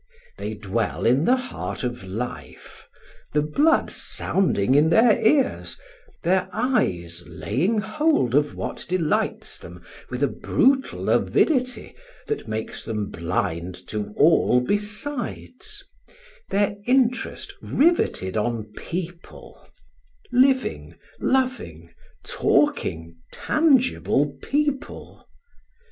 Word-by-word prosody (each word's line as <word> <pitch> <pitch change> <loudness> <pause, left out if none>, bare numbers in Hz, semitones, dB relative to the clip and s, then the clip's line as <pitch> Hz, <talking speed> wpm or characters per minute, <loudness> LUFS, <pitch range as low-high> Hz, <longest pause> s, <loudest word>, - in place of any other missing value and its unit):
They 110 - -4
dwell 105 +1 -2
in 130 +7 +3
the 255 - +5
heart 100 - -5
of 120 -4 -3
life; 110 +7 -7 0.5
the 150 0 +2
blood 295 - +2
sounding 130 - 0
in 150 +3 +5
their 220 +5 +5
ears, 275 +3 +2 0.5
their 185 +2 +2
eyes 90 - 0
laying 140 - -1
hold 220 - +1
of 145 +1 +2
what - - -5
delights 175 -4 -1
them 85 +1 -12 0.3
with 125 +2 -3
a - - +4
brutal 265 - +1
avidity 255 -5 +1 0.3
that 440 - -4
makes 110 0 -4
them 105 -2 -3
blind 85 +1 -2
to 105 -1 -4
all 155 -5 +5
besides, 250 - -4 0.7
their 205 0 +1
interest 250 -2 +1
riveted 280 - +1
on 110 -1 -2
people, 175 0 -7 0.6
living, 260 +1 +2 0.2
loving, 235 - -1 0.3
talking, 80 0 0
tangible 260 - +2
people. 290 -1 -3
165 Hz, 95 wpm, -24 LUFS, -, 0.7 s, the